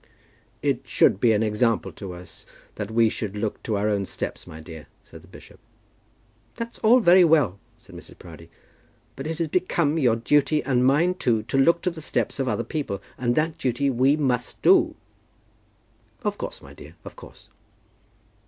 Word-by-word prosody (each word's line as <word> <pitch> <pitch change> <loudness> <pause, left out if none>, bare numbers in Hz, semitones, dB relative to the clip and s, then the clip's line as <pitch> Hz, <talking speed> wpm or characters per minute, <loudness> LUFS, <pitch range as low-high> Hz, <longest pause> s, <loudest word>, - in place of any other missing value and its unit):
"It - - 0
should 95 - +3
be 120 0 +4
an 110 0 +2
example 110 +1 0
to 95 -3 -8
us, 90 +1 -11 0.3
that 105 -1 -6
we 115 0 +3
should 105 -2 -4
look 105 0 -3
to 110 -3 -2
our 105 +1 0
own 100 -2 0
steps, - - -6
my 80 - -10
dear," 80 -3 -11 0.2
said - - -14
the - - -19
bishop. - - -15 1.0
"That's 235 0 -7
all 240 +3 +5
very 180 -2 +6
well," 145 - +3 0.2
said - - -18
Mrs. - - -13
Proudie, - - -13 0.7
"but 135 +3 -6
it 160 0 -4
has 165 - -1
become 165 -2 0
your 120 -6 +3
duty, 145 +5 +1
and 125 -1 +1
mine 150 +8 +3
too, 115 -11 0
to 110 - -5
look 170 +5 +3
to 180 - 0
the 165 -1 -10
steps 150 - -2
of 135 - -1
other 120 - -1
people; 120 -6 -4 0.2
and 120 -1 -1
that 155 +1 -1
duty 135 +2 0
we 135 +4 +2
must 125 -5 -1
do." - - +4 1.3
"Of - - -2
course, - - -7
my - - -13
dear; 75 +4 -14
of - - -10
course." - - -15
125 Hz, 180 wpm, -24 LUFS, 105-155 Hz, 1.3 s, very